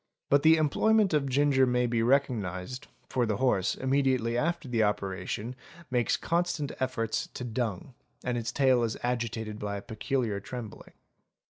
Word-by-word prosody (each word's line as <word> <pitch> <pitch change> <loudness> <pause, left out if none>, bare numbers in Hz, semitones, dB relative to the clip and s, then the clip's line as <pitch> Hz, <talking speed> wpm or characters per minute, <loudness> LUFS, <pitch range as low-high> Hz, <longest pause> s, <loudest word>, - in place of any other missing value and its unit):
But 140 0 +5
the 160 +1 +7
employment 195 +6 +3
of 140 -3 +1
ginger 135 -1 +3
may 125 0 +2
be 120 -1 0
recognised, 120 -4 0 0.2
for 125 -2 0
the 105 -2 0
horse, 105 -7 +1
immediately 130 -3 +1
after 160 +3 -1
the 120 -3 +1
operation, 105 +3 -2 0.4
makes 120 -2 +2
constant 170 -4 -1
efforts 120 -4 -1
to - - -5
dung, 120 -1 -3 0.3
and 125 -1 -1
its 115 -1 -2
tail 130 -3 +3
is 115 -2 -1
agitated 115 -3 -2
by 100 -1 -3
a - - -6
peculiar 115 -2 -2
trembling. 110 -1 -8
125 Hz, 150 wpm, -29 LUFS, 110-135 Hz, 0.4 s, the